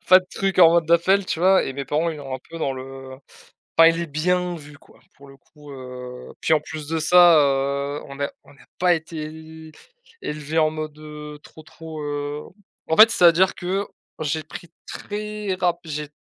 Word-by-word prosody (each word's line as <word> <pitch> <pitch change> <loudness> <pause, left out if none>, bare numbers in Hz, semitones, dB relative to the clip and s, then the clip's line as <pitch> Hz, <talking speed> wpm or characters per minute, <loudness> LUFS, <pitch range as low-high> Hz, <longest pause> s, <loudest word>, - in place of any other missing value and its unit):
pas 185 +1 +6
de 185 - -18
truc 195 -2 0
en 165 -1 +9
mode 170 -1 +2
d'appel 185 +4 +3
tu 165 - -3
vois? 190 +1 +4
Et 135 - -4
mes 140 0 -5
parents 155 +5 0
ils 155 -3 -5
ont 135 -2 -8
un - - -5
peu 165 - -9
dans 140 -4 -1
le, 130 0 -7 0.3
heu - - -20 0.6
pas 165 0 +8
il 165 0 -1
est 170 - -2
bien 175 +4 -1
vu 145 -2 -12
quoi - - -22 0.2
pour 140 0 -16
le 135 0 -16
coup, 145 +1 -16
heu, 125 -1 -9
puis 160 - +2
en 155 - +4
plus 155 -1 -8
de 165 0 -1
ça, 175 0 +6
heu, 140 0 0
on 140 - -10
n'a 140 0 -3
on - - -19
n'a - - -20
pas 180 -1 +3
été 160 0 -7 0.5
é - - -5
élevé 150 +2 -2
en 155 0 +3
mode, 155 -1 -6
heu, 150 -1 -10
trop 155 - -15
trop, 160 -1 -10
heu 145 0 -4 0.4
en 160 - +1
fait 220 +1 +9
c'est-à-dire 180 -1 +4
que 190 +3 -3 0.3
j'ai 155 +1 -2
pris 175 - -11 0.2
très 210 -2 -5
rap 175 -1 +1
j'ai 150 -2 -5
155 Hz, 210 wpm, -22 LUFS, 145-175 Hz, 0.6 s, en